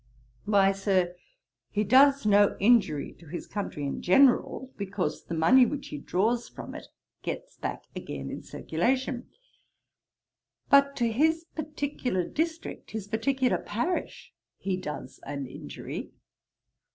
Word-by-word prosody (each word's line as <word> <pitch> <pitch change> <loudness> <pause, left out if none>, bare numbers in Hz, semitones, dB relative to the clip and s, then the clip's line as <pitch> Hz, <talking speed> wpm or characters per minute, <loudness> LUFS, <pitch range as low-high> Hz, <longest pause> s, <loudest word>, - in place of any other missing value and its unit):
'Why, 200 -2 +4
Sir, 190 -3 +1 0.6
he 210 - 0
does 275 +4 +5
no 205 -1 +5
injury 205 -9 +3
to 170 - -15
his 170 - -6
country 195 -8 -4
in 140 - -3
general, 260 +4 +3
because 200 -1 -3
the 170 - -4
money 225 +12 +6
which 285 +3 -2
he 145 - -5
draws 230 +10 0
from - - -9
it - - -9 0.3
gets - - -5
back - - -4
again 70 -1 -5
in - - -6
circulation; 250 +8 -1 1.4
but 280 0 +6
to 235 -3 +1
his 320 +7 +2
particular 285 - -2
district, 325 +1 -3
his 220 -3 -5
particular 250 +4 +1
parish, 325 - -3 0.2
he 195 -1 -1
does 150 -7 -6
an 140 -1 -5
injury. - - -7
215 Hz, 125 wpm, -28 LUFS, 185-265 Hz, 1.4 s, money